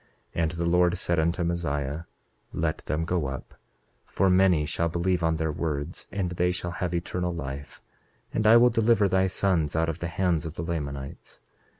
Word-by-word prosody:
28:7 - - -1
And 80 -1 +1
the 85 0 -2
Lord 90 +1 +3
said 85 -2 +1
unto 85 +3 +1
Mosiah: 75 -3 -2 0.5
Let 80 0 -1
them 80 +2 -1
go 85 -4 0
up, 65 0 -7 0.5
for 95 -1 +1
many 90 -4 +4
shall 85 +2 0
believe 85 +2 0
on 80 -1 +2
their 80 0 -1
words, 75 +1 -4
and 95 -2 -2
they 90 0 +1
shall 90 -1 -3
have 90 0 -2
eternal 90 +1 -2
life; 70 -4 -7 0.5
and 110 0 +1
I 115 +2 +9
will 120 +1 +6
deliver 115 -2 +3
thy 95 0 +2
sons 90 -6 +1
out 80 +1 +1
of 80 - -4
the 85 - -3
hands 85 -2 0
of 80 - -8
the - - -4
Lamanites. 70 -5 -5
85 Hz, 190 wpm, -27 LUFS, 80-90 Hz, 0.5 s, I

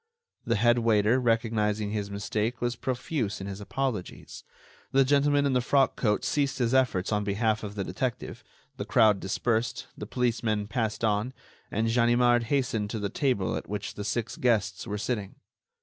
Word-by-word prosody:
The 115 - +1
head 120 +2 +3
waiter, 115 +1 +3
recognizing 110 -3 0
his 105 -2 -3
mistake, 105 +4 -2
was 120 0 -1
profuse 120 -2 -2
in 95 - -6
his 100 +1 -6
apologies; 120 -3 -4 0.5
the 135 0 +4
gentleman 145 +1 +3
in 140 - +1
the 125 - +2
frock 135 +1 +2
coat 105 -3 0
ceased 140 -2 0
his 120 -1 0
efforts 125 -9 +2
on 105 -1 +1
behalf 105 +2 0
of 105 -1 -6
the 100 - -2
detective, 125 +3 -4 0.3
the - - -3
crowd 110 -4 +4
dispersed, 110 +4 -1
the - - -7
policemen 115 -4 0
passed 110 -1 -2
on, 110 +3 +1 0.4
and 110 +2 0
Ganimard 120 +1 +3
hastened 115 -5 0
to 110 - -3
the 100 -1 -2
table 125 -9 0
at - - -6
which 105 0 -4
the 105 - -6
six 110 +3 -3
guests 105 -5 0
were 105 -1 -3
sitting. 105 -3 -3
115 Hz, 170 wpm, -28 LUFS, 105-125 Hz, 0.5 s, the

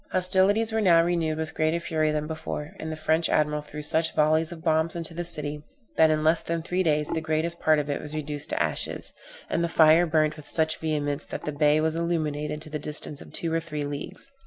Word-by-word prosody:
Hostilities 190 +4 +2
were 220 0 0
now 170 -4 +5
renewed 165 -2 0
with 160 0 -4
greater 155 +2 +1
fury 155 -2 0
than 150 0 -1
before, 160 +1 -5
and 160 - -4
the - - -3
French 160 +1 +1
admiral 150 0 +1
threw 150 0 -8
such 160 +2 0
volleys 155 +2 +3
of 165 -2 -9
bombs 160 0 +1
into 165 -1 -3
the 175 +1 -3
city, 150 -3 -2 0.3
that 160 0 +5
in 155 0 +1
less 160 +1 +3
than 165 -1 -3
three 180 +2 -1
days 150 -3 +1
the 160 - -1
greatest 160 +2 -1
part 155 -1 +4
of 145 -1 -1
it 145 - -2
was 150 +1 -5
reduced 150 -1 -4
to - - -1
ashes; - - -2 0.3
and 170 - 0
the 170 - 0
fire 165 +1 +5
burnt 155 -1 +1
with 150 - -12
such 160 -1 0
vehemence 150 -2 -1
that - - -7
the 150 - -2
bay 150 +1 +3
was 160 0 0
illuminated 155 -3 -2
to 155 - -10
the 150 - -3
distance 150 -1 -3
of - - -12
two 165 -1 -2
or 165 - +2
three 150 -3 -5
leagues. 145 - -7
155 Hz, 230 wpm, -26 LUFS, 150-165 Hz, 0.3 s, now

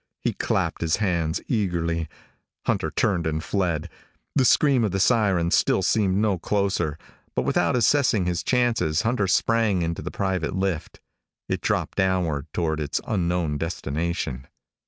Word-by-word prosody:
He - - -1
clapped - - -1
his 80 -2 +2
hands 85 -6 0
eagerly. 85 - -1 0.6
Hunter - - 0
turned 90 -6 0
and 80 0 -2
fled. 90 -5 -1 0.5
The 130 - +3
scream 135 -1 +4
of 110 - +1
the 95 - -2
sirens 95 -6 +2
still - - +3
seemed 100 -3 +2
no 105 -3 +1
closer, 95 -6 0 0.4
but - - +1
without - - +1
assessing 120 -5 +3
his 90 -1 -1
chances 120 -11 +1
Hunter 110 -4 +1
sprang 105 -2 +2
into 85 0 -3
the - - -5
private 95 -5 -2
lift. 95 -4 -2 0.5
It - - -2
dropped - - -1
downward 85 -6 0
toward 80 -2 -1
its 75 -1 -1
unknown 85 -7 -1
destination. 80 -4 -3
90 Hz, 145 wpm, -24 LUFS, 80-105 Hz, 0.6 s, scream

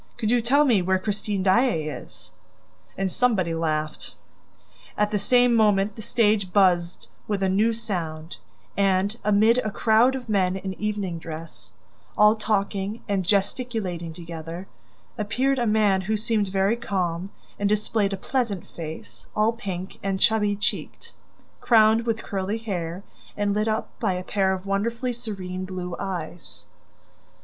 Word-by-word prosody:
Could 220 0 0
you 245 -1 +3
tell 280 +6 +4
me 230 -8 +4
where 190 +1 +2
Christine 205 0 -2
Daae 195 -2 +3
is?" 150 - -9 0.7
And 190 -1 -1
somebody 195 -9 +1
laughed. 155 -2 -2 0.8
At 210 0 +1
the 210 - +1
same 245 +3 +4
moment 210 -2 +3
the 220 - -8
stage 210 -4 +1
buzzed 180 -3 +2 0.2
with 200 -2 -1
a 190 - +2
new 210 +5 +3
sound 170 -8 -4 0.4
and, 195 +1 +2
amid 215 +4 +4
a 215 - -1
crowd 225 +5 +3
of 250 -2 -6
men 190 -4 +1
in 190 0 -4
evening 205 -5 -2
dress, 160 0 -9 0.4
all 210 +1 +6
talking 205 0 -1
and 195 -2 0
gesticulating 195 -3 -1
together, 165 +1 -7 0.5
appeared 255 +6 +1
a 240 - +1
man 210 -3 +3
who 215 +3 -1
seemed 215 -1 0
very 195 +3 +1
calm 185 -5 -2 0.3
and 205 0 +1
displayed 210 -1 +1
a 195 - -2
pleasant 220 -4 -2
face, 160 -1 -8
all 215 +2 +3
pink 190 -5 -6
and 195 -1 -1
chubby 210 -2 +2
cheeked, 205 - -4 0.5
crowned 225 0 +4
with 225 -1 -1
curly 195 +2 -2
hair 185 -5 -4 0.3
and 205 -1 +1
lit 210 +2 0
up 220 0 0
by 190 - +1
a 180 0 -4
pair 190 0 +1
of 190 0 -3
wonderfully 230 +5 -1
serene 190 -6 -5
blue 180 -2 -5
eyes. 175 -3 -6
200 Hz, 150 wpm, -25 LUFS, 185-220 Hz, 0.8 s, all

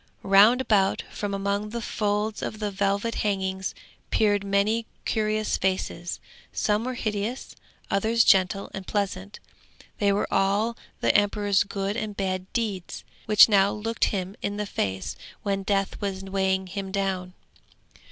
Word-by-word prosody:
Round 205 +6 +6
about, 200 -6 +2
from 205 -1 -4
among 200 +1 -1
the 235 +2 -4
folds 210 -1 -1
of 215 - -4
the 210 -1 -2
velvet 200 +3 0
hangings 190 -2 -1 0.3
peered 205 -2 +2
many 200 +3 +1 0.2
curious 215 0 0
faces: 185 -2 -2 0.3
some 210 +2 0
were 255 0 -3
hideous, 215 +2 -3 0.4
others 220 +4 +3
gentle 190 0 +3
and 190 -1 -7
pleasant. 200 -1 -3 0.6
They 200 -1 +3
were 200 - +1
all 205 +4 +2 0.3
the - - +3
emperor's 205 -1 +3
good 200 0 -3
and 215 -3 -4
bad 185 -1 -2
deeds, 205 -7 -3 0.2
which 210 -1 +8
now 200 -2 +4
looked 225 +2 -1
him 190 -1 -3
in 205 0 -2
the 210 - -2
face 95 - -3 0.3
when 200 -2 0
Death 195 +1 -1
was 195 -2 -3
weighing 190 0 0
him 195 +1 -5
down. 190 -2 -2
200 Hz, 140 wpm, -26 LUFS, 195-210 Hz, 0.6 s, which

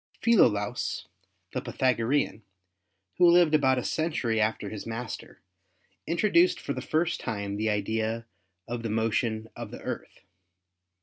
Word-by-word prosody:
Philolaus, 105 - +2 0.5
the - - -1
Pythagorean, 130 -1 0 0.8
who 175 - +7
lived 170 -2 +5
about 135 -4 +4
a 125 - -1
century 130 -9 0
after 105 -1 0
his 105 0 -7
master, 115 0 -6 0.6
introduced 215 - +3
for - - -3
the - - -5
first 165 +2 0
time 100 -2 -3
the 110 +2 0
idea 110 +2 -1 0.4
of 120 0 -4
the 115 - -3
motion 110 0 0
of - - -6
the - - -9
Earth. - - -6
115 Hz, 130 wpm, -28 LUFS, 110-155 Hz, 0.8 s, who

